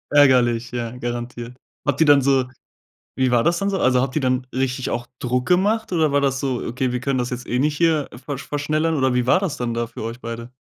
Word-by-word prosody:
Ärgerlich, 120 -4 +4
ja, 120 -2 -3
garantiert. 120 0 -5 0.3
Habt 145 0 0
ihr 160 - +5
dann 145 -1 +7
so 130 -1 +2 0.7
wie 130 -1 +2
war 120 -1 +3
das 170 +4 +2
dann 200 +2 0
so? 195 - -1
Also 125 -1 +3
habt 130 -1 -2
ihr 155 - +1
dann 130 -1 0
richtig 130 0 -1
auch 120 0 -3
Druck 125 0 -1
gemacht 205 +5 +2
oder 160 -5 +1
war 145 - +3
das 135 -1 +1
so, 130 -3 -2
okay, 125 +1 -2
wir 125 - -2
können 135 0 -1
das 125 0 -2
jetzt 125 -1 -5
nicht 140 +5 +1
hier 160 -2 +1 0.2
ver 145 - -3
verschnellern 155 +4 -1
oder 130 -3 +1
wie 125 -1 +1
war 180 +8 +4
das 180 -7 -2
dann 120 -3 -2
da 115 0 -1
für 115 - -9
euch 115 +2 -5
beide? 115 0 -7
130 Hz, 235 wpm, -21 LUFS, 120-145 Hz, 0.7 s, dann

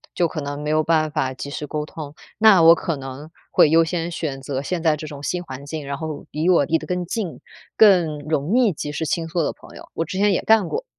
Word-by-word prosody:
就 175 - +2
可 155 -1 -5
能 145 0 -5
没 150 - -1
有 155 0 +3
办 155 -1 +1
法 140 -4 -1
及 140 +2 -7
时 150 0 -5
沟 150 0 -3
通。 150 -2 -9 0.2
那 205 -6 +7
我 165 +1 +9
可 165 -1 -2
能 135 +3 -8 0.2
会 - - +5
优 165 +1 +5
先 170 0 -2
选 150 -5 -4
择 135 0 -4
现 175 +2 -3
在 160 -2 +2
这 155 - -7
种 145 -2 -8
新 180 +4 -3
环 135 -3 -9
境， 155 -1 -5
然 140 0 -3
后 155 -1 -6
离 160 +4 0
我 170 -6 +4
离 165 +3 +1
得 - - -10
更 180 -1 -2
近， 200 -3 -4 0.4
更 180 -8 +5
容 155 - 0
易 230 -8 +3
及 145 0 -5
时 155 +2 -3
倾 165 +2 -1
诉 165 0 -1
的 - - -1
朋 - - -16
友， - - -12
我 165 - -2
之 185 - -6
前 205 0 +3
也 - - 0
干 220 -5 +4
过。 - - -4
160 Hz, 280 characters per minute, -22 LUFS, 145-175 Hz, 0.4 s, 我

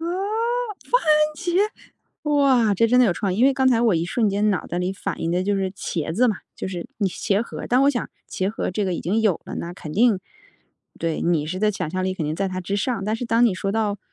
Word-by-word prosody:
番 330 - -3
茄。 420 +6 -1 1.8
哇， 260 -7 +4
这 230 +4 +3
真 250 +2 +3
的 250 - +7
有 185 - +3
创 190 0 -2
意， - - -4
因 245 - +5
为 275 - +5
刚 265 -1 +3
才 235 -2 +3
我 225 -6 +3
一 165 +1 0
瞬 215 +4 +1
间 205 +2 +2
脑 190 - -1
袋 175 - -3
里 180 +1 -1
反 195 0 -5
应 165 - -1
的 180 +1 +1
就 200 +1 0
是 190 -1 -1
茄 160 -4 -3
子 250 +4 +4
嘛， 210 - 0 0.2
就 - - -4
是 175 -2 -5
你 200 -3 +1
是 - - -9
茄 205 +1 +1
盒， - - -7
但 250 +2 +4
我 280 - +5
想 240 -5 -3 0.2
茄 190 +1 -1
盒 210 - -3
这 200 +3 -1
个 185 -2 -1
已 - - -3
经 210 +6 0
有 210 -7 +2
了， - - -7
那 170 +1 -5
肯 155 -4 -8
定 220 0 +4 0.8
对， 165 -1 -2
你 165 -3 +1
是 185 +4 -4
在 210 +1 +2
想 180 -6 -4
象 185 +1 -2
力 190 0 -1
肯 160 - -3
定 155 - -2
在 195 +2 -1
它 185 0 -4
之 195 +3 -2
上， 210 -1 -1
但 215 +1 0
是 245 - -4
当 235 +1 +3
你 195 - +1
说 195 +1 -2
到 210 -2 0
200 Hz, 285 characters per minute, -23 LUFS, 185-235 Hz, 1.8 s, 的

